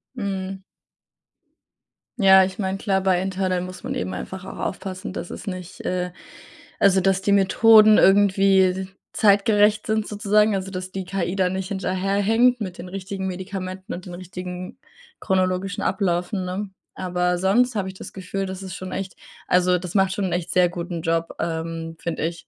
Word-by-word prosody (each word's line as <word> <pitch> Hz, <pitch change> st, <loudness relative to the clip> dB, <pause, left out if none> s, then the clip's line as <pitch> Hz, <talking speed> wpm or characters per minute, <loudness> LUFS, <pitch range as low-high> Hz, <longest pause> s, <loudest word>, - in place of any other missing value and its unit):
Mhm. 195 Hz, -3 st, -4 dB, 1.6 s
Ja, 190 Hz, -3 st, +7 dB
ich 185 Hz, +1 st, -4 dB
meine, 190 Hz, -1 st, -1 dB
klar, 195 Hz, -1 st, 0 dB
bei 185 Hz, -1 st, +2 dB
Internet 185 Hz, -1 st, -1 dB
muss 185 Hz, 0 st, -9 dB
man -, -, -3 dB
eben 95 Hz, +1 st, -3 dB
einfach 185 Hz, -, -6 dB
auch 190 Hz, -, -9 dB
aufpassen, 185 Hz, 0 st, -5 dB
dass -, -, -6 dB
es -, -, -9 dB
nicht 185 Hz, -2 st, -6 dB
äh, 180 Hz, 0 st, -2 dB, 0.7 s
also, 195 Hz, -1 st, +4 dB
dass 195 Hz, +1 st, +2 dB
die 200 Hz, -, +1 dB
Methoden 215 Hz, +2 st, +6 dB
irgendwie 195 Hz, -1 st, +4 dB, 0.2 s
zeitgerecht 210 Hz, +1 st, +3 dB
sind 220 Hz, -1 st, 0 dB
sozusagen, 210 Hz, 0 st, +2 dB
also, 195 Hz, -1 st, -2 dB
dass 185 Hz, 0 st, -6 dB
die 190 Hz, 0 st, -4 dB
KI 180 Hz, -1 st, -2 dB
da 185 Hz, -2 st, +2 dB
nicht 190 Hz, +1 st, -4 dB
hinterherhängt 200 Hz, +6 st, +1 dB
mit 185 Hz, -4 st, -5 dB
den 180 Hz, +1 st, -8 dB
richtigen 190 Hz, 0 st, -5 dB
Medikamenten 185 Hz, 0 st, -6 dB
und 180 Hz, -, -7 dB
den 180 Hz, -, -8 dB
richtigen 180 Hz, 0 st, -7 dB, 0.4 s
chronologischen 185 Hz, +1 st, 0 dB
Abläufen, 185 Hz, 0 st, -1 dB
ne? 190 Hz, +3 st, -4 dB, 0.2 s
Aber 180 Hz, -1 st, -1 dB
sonst 225 Hz, +7 st, +2 dB
habe 200 Hz, -3 st, -1 dB
ich 190 Hz, -, -6 dB
das -, -, -10 dB
Gefühl, 195 Hz, +1 st, -4 dB
das 190 Hz, 0 st, -6 dB
ist 185 Hz, -2 st, -7 dB
schon 185 Hz, 0 st, -7 dB
echt 190 Hz, -1 st, -5 dB, 0.3 s
also, 180 Hz, 0 st, +3 dB
das 180 Hz, +1 st, -8 dB
macht 190 Hz, -1 st, +3 dB
schon 200 Hz, 0 st, -2 dB
'n 185 Hz, -, -2 dB
echt 175 Hz, 0 st, -2 dB
sehr 180 Hz, -1 st, +4 dB
guten 175 Hz, -1 st, -5 dB
Job, 165 Hz, 0 st, -1 dB
ähm, 165 Hz, 0 st, -4 dB
finde 165 Hz, -2 st, -3 dB
ich. 170 Hz, 0 st, -5 dB
190 Hz, 170 wpm, -23 LUFS, 180-195 Hz, 1.6 s, Ja